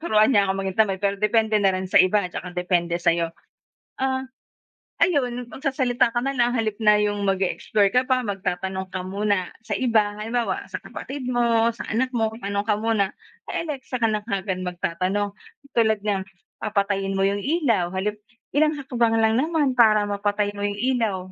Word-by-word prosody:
tinuturuan 215 Hz, -6 st, +4 dB
niya 200 Hz, -3 st, +4 dB
ako -, -, +2 dB
maging 190 Hz, -1 st, -3 dB
tamad, 200 Hz, -4 st, +2 dB
pero 200 Hz, 0 st, +1 dB
depende 220 Hz, 0 st, +2 dB
na 195 Hz, -1 st, +3 dB
rin 185 Hz, 0 st, -3 dB
sa -, -, 0 dB
iba, 195 Hz, +1 st, +3 dB
'tsaka 180 Hz, 0 st, -7 dB
depende 175 Hz, -1 st, +1 dB
sa'yo. 170 Hz, -1 st, +1 dB, 0.7 s
Ah, 265 Hz, 0 st, 0 dB, 0.7 s
ayun 250 Hz, -8 st, +1 dB
magsasalita 260 Hz, -2 st, +1 dB
ka 240 Hz, -, 0 dB
nalang 250 Hz, -3 st, +1 dB
sa -, -, +1 dB
halip 215 Hz, -2 st, -2 dB
na 210 Hz, -1 st, +6 dB
yung 205 Hz, -1 st, 0 dB
mag-e-explore 195 Hz, +1 st, +1 dB
ka 250 Hz, -, +5 dB
pa 255 Hz, -1 st, +2 dB
magtatanong 190 Hz, -1 st, -3 dB
ka 185 Hz, -1 st, -4 dB
muna 200 Hz, -1 st, -1 dB
sa -, -, -3 dB
iba, 220 Hz, -5 st, +2 dB
halimbawa 230 Hz, +2 st, -2 dB
sa -, -, -4 dB
kapatid 270 Hz, -2 st, -7 dB
mo, 235 Hz, -2 st, +2 dB
sa 230 Hz, -, -8 dB
anak 255 Hz, +4 st, 0 dB
mo, 225 Hz, -1 st, +1 dB
tanong 200 Hz, -1 st, -2 dB
ka 210 Hz, -, +3 dB
muna 220 Hz, -3 st, +1 dB, 0.4 s
kay -, -, -2 dB
Alexa 265 Hz, -4 st, -4 dB
ka 225 Hz, -, +4 dB
na 215 Hz, -1 st, -1 dB
kaagad 195 Hz, -3 st, -2 dB
magtatanong. 185 Hz, +3 st, -2 dB, 0.4 s
Tulad 220 Hz, -2 st, +3 dB
ng, 200 Hz, -2 st, 0 dB, 0.4 s
papatayin 200 Hz, -2 st, 0 dB
mo 195 Hz, -, 0 dB
yung 200 Hz, +1 st, 0 dB
ilaw 230 Hz, -, +1 dB
sa 190 Hz, -, -1 dB
halip 210 Hz, +1 st, -2 dB, 0.4 s
ilang 305 Hz, +1 st, +4 dB
hakbang 240 Hz, -5 st, +1 dB
lang 220 Hz, 0 st, +3 dB
naman 290 Hz, -2 st, +1 dB
para 215 Hz, -3 st, +6 dB
mapatay 205 Hz, 0 st, 0 dB
mo 205 Hz, -, -2 dB
yung 205 Hz, 0 st, -3 dB
ilaw 235 Hz, -5 st, +1 dB
210 Hz, 180 wpm, -23 LUFS, 195-240 Hz, 0.7 s, na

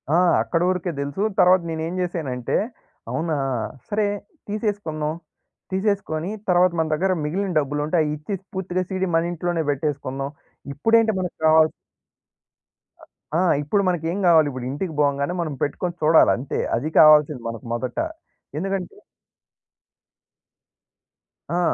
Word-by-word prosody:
ఆ! -, -, +5 dB, 0.3 s
అక్కడ 165 Hz, -, -1 dB
వరకే 180 Hz, -1 st, -1 dB
దెలుసు. 140 Hz, +8 st, -2 dB, 0.2 s
తరువాత 180 Hz, +1 st, +6 dB
నేనేం 160 Hz, +1 st, -3 dB
జేశానంటే, 145 Hz, -9 st, -2 dB, 0.6 s
అవునా 160 Hz, -1 st, -1 dB, 0.5 s
సరే! 210 Hz, 0 st, +1 dB, 0.4 s
తీసేసుకుందాం. 200 Hz, -8 st, -2 dB, 0.6 s
తీసేసుకొని 190 Hz, -4 st, -1 dB, 0.2 s
తర్వాత 180 Hz, 0 st, +5 dB
మన 160 Hz, -1 st, +1 dB
దగ్గర 185 Hz, +5 st, +1 dB
మిగిలిన 190 Hz, +7 st, -1 dB
డబ్బులు 145 Hz, 0 st, -2 dB
ఉంటే 165 Hz, +3 st, 0 dB
అయిచ్చేసి 150 Hz, +6 st, -4 dB
పూర్తిగా 185 Hz, -1 st, -2 dB
సీడీ 190 Hz, -1 st, -1 dB
మన 165 Hz, +1 st, +2 dB
ఇంట్లోనే 175 Hz, -1 st, -1 dB
పెట్టేసుకుందాం. 140 Hz, -1 st, -3 dB, 0.4 s
ఇప్పుడేంటి 225 Hz, +9 st, +3 dB
మనకు 180 Hz, -1 st, -3 dB
కావాల్ 155 Hz, 0 st, +6 dB, 1.3 s
ఆ 160 Hz, -, -6 dB
ఆ! -, -, +3 dB, 0.2 s
ఇప్పుడు 200 Hz, +8 st, +1 dB
మనకేం 175 Hz, +2 st, -1 dB
గావాలి. 160 Hz, -3 st, +6 dB
ఇప్పుడింటికి 135 Hz, +7 st, -4 dB
పోంగానే 140 Hz, +3 st, +1 dB
మనం 155 Hz, -3 st, -3 dB
పెట్టుకొని 170 Hz, +4 st, -2 dB
చూడాలి. 160 Hz, +1 st, +6 dB
అంతే. 130 Hz, +3 st, -4 dB, 0.2 s
అది 145 Hz, +7 st, -2 dB
కావాల్సింది 150 Hz, -4 st, +6 dB
మనకు 115 Hz, 0 st, -8 dB
మొదట. 125 Hz, +1 st, -4 dB, 0.6 s
ఎందుకంటే 195 Hz, -, -3 dB, 2.6 s
ఆ! -, -, +2 dB
165 Hz, 120 wpm, -23 LUFS, 150-185 Hz, 2.6 s, తరువాత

